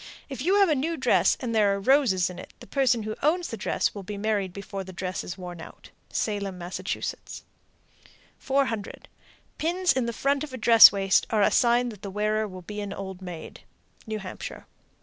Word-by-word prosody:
If 270 -2 -6
you 365 +7 +2
have 400 -1 +5
a - - +4
new 315 +4 -1
dress - - +3
and 240 -3 -3
there 205 -3 +3
are - - -4
roses 205 -6 +3
in 180 - -10
it, - - -11
the - - -12
person 255 -5 +1
who 215 0 -4
owns 335 +5 +1
the - - -4
dress 215 - -1
will 200 - -7
be 200 +2 -7
married 205 -2 -1
before 200 +1 -6
the 190 - -10
dress 185 0 -4
is 180 - -7
worn 175 -2 -8
out. - - -13 0.2
Salem, 200 -3 -2
Mass. 175 +1 -6 1.6
400. 265 -6 -2 0.5
Pins 350 +3 +1
in 255 -3 -1
the - - -1
front 275 +4 0
of 295 -4 -8
a - - -4
dress 230 -1 +9
waist 195 -1 +2
are 215 -2 +2
a - - +4
sign 240 0 +3
that 210 -4 -11
the 200 - -6
wearer 215 +2 0
will 185 -2 -10
be 210 +3 -6
an 200 -1 -5
old 190 -1 -7
maid. 175 -3 -8 0.5
_New 215 - -2
Hampshire. 190 - -8
215 Hz, 205 wpm, -26 LUFS, 195-260 Hz, 1.6 s, dress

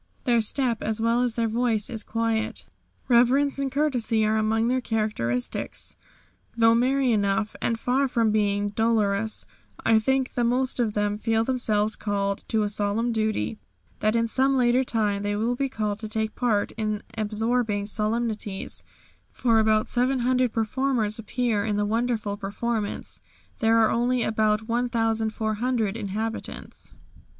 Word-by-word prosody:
Their 235 -2 +3
step, 235 0 0
as 220 0 -1
well 230 +2 +2
as 245 -2 0
their 230 -1 +1
voice, 225 -2 0
is 225 -2 -5
quiet. 225 0 -1 0.4
Reverence 265 +4 +3
and 275 -1 -1
courtesy 245 -7 +1
are 215 +1 +2
among 220 +1 +1
their 255 +1 +1
characteristics. 210 - -2 0.6
Though 225 0 +5
merry 255 +2 +2
enough, 205 0 0
and 230 -1 0
far 265 +4 +1
from 230 -3 +1
being 205 -1 +1
dolorous, 220 -1 0 0.4
I 225 -1 +5
think 265 +3 0
the 245 - 0
most 250 +2 +1
of 220 -3 0
them 205 0 0
feel 225 0 +1
themselves 220 -4 0
called 200 -1 -2
to 220 -1 +1
a - - 0
solemn 210 +3 0
duty, 220 -1 -1 0.4
that 215 +1 +1
in 230 0 +2
some 265 +3 +2
later 250 +1 +3
time 210 -5 0
they 205 0 -1
will 225 +4 0
be 275 +2 -1
called 210 -4 -2
to 220 - -5
take 220 0 -2
part 220 -5 0
in 215 -1 -2
absorbing 220 0 0
solemnities, 215 -1 -2 0.5
for 230 -3 +2
about 215 0 +3
700 255 0 +1
performers 225 -1 -1
appear 225 -1 -1
in 210 -1 -1
the 205 - +1
wonderful 220 -2 -1
performance; 210 +1 -4 0.4
there 225 0 +3
are 225 -1 +4
only 245 +1 +1
about 215 0 +1
1,400 225 -1 0
inhabitants. 220 +1 -5
225 Hz, 145 wpm, -25 LUFS, 215-240 Hz, 0.6 s, Though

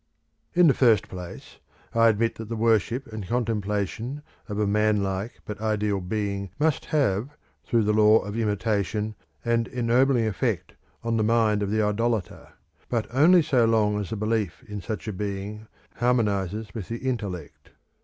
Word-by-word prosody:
In 180 0 +6
the 145 - +6
first 115 -6 +4
place, 90 -2 -9 0.3
I 115 0 +5
admit 115 +1 +2
that 115 -1 -6
the 115 - -2
worship 115 +3 +1
and 105 -4 -5
contemplation 115 +3 -2 0.3
of 105 - -3
a 105 - +1
man 105 0 +2
like 95 +4 -4
but 105 0 -7
ideal 105 -2 0
Being 100 0 -3
must 155 0 +1
have, 140 -1 0 0.3
through 115 -2 +2
the 105 +1 +2
law 110 0 +6
of 105 -1 -4
imitation, 105 -1 -1 0.3
an 115 0 +1
ennobling 125 0 +2
effect 110 -3 -1 0.3
on 115 0 0
the 110 - +2
mind 110 -2 +2
of 100 - -1
the 110 +1 +1
idolater, 110 0 -1 0.4
but 115 -3 0
only 165 +6 +6
so 130 -7 +3
long 105 -2 +2
as 100 - -4
the 110 - -3
belief 105 -4 -1
in 105 -1 -6
such 110 +4 -5
a 110 - -2
Being 100 +2 -5 0.3
harmonises 105 -4 0
with 105 -6 -6
the 115 - -4
intellect. 100 - -4
110 Hz, 165 wpm, -25 LUFS, 105-115 Hz, 0.4 s, In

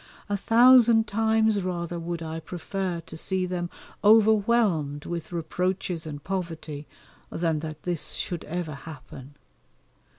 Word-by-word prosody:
A 205 - +1
thousand 235 +1 +6
times 220 0 +2
rather 175 -2 -3
would 170 0 -4
I 160 0 -4
prefer 180 +1 -4
to 160 - -11
see 185 +3 -1
them 175 -1 -3 0.3
overwhelmed 210 -8 +4
with 170 0 -5
reproaches 175 0 -2
and 145 -2 -7
poverty 165 -6 -4 0.4
than 165 -2 0
that 155 -1 -7
this 175 -3 -2
should 175 -3 -3
ever 165 -1 -4
happen. 140 -2 -11
175 Hz, 125 wpm, -26 LUFS, 160-205 Hz, 0.4 s, thousand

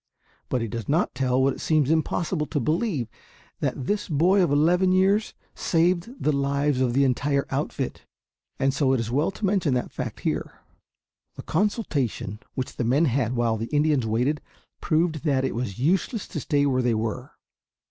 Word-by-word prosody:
But 125 - 0
he - - -2
does 115 +3 -6
not 160 +5 +1
tell 125 0 +1
what 135 0 +3
it - - -9
seems 155 -3 +2
impossible 160 0 0
to 150 - -1
believe 155 - 0 0.5
that 130 - -2
this 205 +3 -1
boy 175 +6 +3
of 175 - +2
eleven 175 +6 +3
years 195 +3 +2 0.2
saved 175 +3 +1
the 150 - +1
lives 140 -1 0
of 125 -2 +1
the 140 +2 +3
entire 140 +2 +1
outfit; - - -3 0.5
and 135 0 +1
so 140 -1 +2
it 130 - +1
is 115 0 -3
well 145 +5 +2
to 200 - -4
mention 185 -9 +1
the 125 - -1
fact - - -6
here. - - -2 0.8
The - - -8
consultation 155 - -1 0.2
which 130 - -4
the - - 0
men 135 +8 +3
had 125 -3 0
while 115 -2 +1
the 115 +2 -4
Indians 145 -4 +1
waited 125 +7 0 0.4
proved 160 -1 +1
that 135 -4 +1
it - - -1
was 115 -5 -4
useless 185 - 0
to 155 - -4
stay 145 0 +1
where 130 -2 +2
they 120 -2 +1
were. 110 0 -3
145 Hz, 180 wpm, -25 LUFS, 125-165 Hz, 0.8 s, what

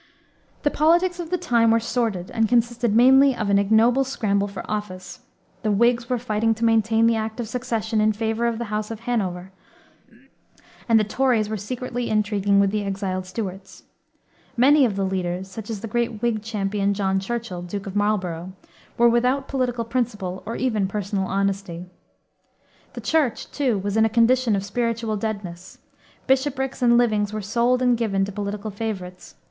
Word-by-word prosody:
The 290 - +2
politics 345 +4 +2
of 335 -2 -5
the 360 - 0
time 240 -10 +2
were 230 +1 +4
sordid 225 -6 -2
and 225 -1 +1
consisted 235 -2 +1
mainly 265 +3 +6
of 210 -3 -2
an 200 - +4
ignoble 225 +6 +3
scramble 205 -7 -1
for 200 -1 -7
office. 195 -3 -5 0.4
The 215 - -1
Whigs 235 +3 +2
were 250 - +1
fighting 225 -1 0
to 230 +2 -1
maintain 225 0 +3
the 230 0 +3
Act 220 +1 -4
of 235 - -3
Succession 225 -2 -2
in 215 0 +3
favor 225 +2 -1
of 230 -1 -1
the 225 -2 -5
House 210 0 -2
of 225 -1 -7
Hanover, 190 -6 -2 1.4
and 225 -1 +6
the - - +2
Tories 225 -1 +1
were 220 - -2
secretly 245 +3 -4
intriguing 205 -2 +2
with 200 -1 +3
the 210 0 -1
exiled 190 -2 -3
Stuarts. 190 -1 -7 0.7
Many 275 +3 +5
of 215 -5 -1
the 195 -1 -1
leaders, 185 -1 -2
such 215 +2 -8
as 215 -3 -4
the 230 - -5
great 235 0 -2
Whig 230 -3 0
champion, 200 -2 -1
John 195 -1 0
Churchill, 195 -3 -4
Duke 190 +3 -6
of 195 0 -7
Marlborough, 185 -4 -1 0.4
were 235 - +5
without 250 +3 +2
political 245 -3 -1
principle 215 -6 -3
or 230 - -3
even 220 -6 0
personal 195 -1 -2
honesty. 195 -3 -2 1.1
The - - -7
Church, 300 -8 0
too, 260 -7 0
was 200 +1 -3
in 220 0 +4
a - - +2
condition 235 0 +3
of 195 0 -2
spiritual 230 +1 -1
deadness. 200 -5 -5 0.5
Bishoprics 265 0 0
and 240 -1 +5
livings 215 -4 +2
were 215 - -3
sold 240 +4 +1
and 245 -1 +4
given 200 -4 0
to 200 - -6
political 205 +1 -4
favorites. 195 -4 -6
220 Hz, 175 wpm, -23 LUFS, 200-240 Hz, 1.4 s, mainly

